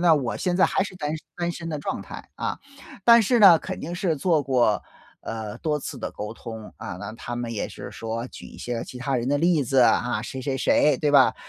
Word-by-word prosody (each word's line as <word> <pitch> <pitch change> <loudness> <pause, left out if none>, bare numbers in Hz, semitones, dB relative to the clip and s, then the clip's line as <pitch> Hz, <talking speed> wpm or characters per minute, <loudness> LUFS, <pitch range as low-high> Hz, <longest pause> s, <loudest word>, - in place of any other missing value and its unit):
那 170 -2 +6
我 130 -5 -1
现 180 -1 0
在 - - +5
还 - - +2
是 195 - -8
单 150 -3 -3
身 155 - -14
单 175 0 -1
身 165 -1 -6
的 150 -2 -3
状 - - -3
态 - - -10
啊， - - -3 0.5
但 235 -1 +8
是 240 +4 +3
呢， 190 -7 +9
肯 - - -6
定 170 +3 -5
是 175 -4 0
做 160 0 +2
过， 125 -6 +2 0.4
呃， 110 -2 -5
多 150 -2 -1
次 - - -6
的 - - -4
沟 105 +1 -5
通， 110 -2 -9
啊。 90 - -6
那 105 +1 -6
他 120 +1 -6
们 120 -1 -3
也 105 - -3
是 - - -9
说 115 +1 -4
举 - - -11
一 - - -13
些 120 -1 -4
其 125 - -10
他 135 0 -1
人 120 +2 -1
的 145 - +2
例 165 -2 +3
子 135 +2 +1
啊， 120 -2 +3
谁 130 +3 -6
谁 135 0 -2
谁， 150 +2 +3
对 150 -2 +1
吧？ 140 -2 +6
140 Hz, 260 characters per minute, -25 LUFS, 115-165 Hz, 0.5 s, 呢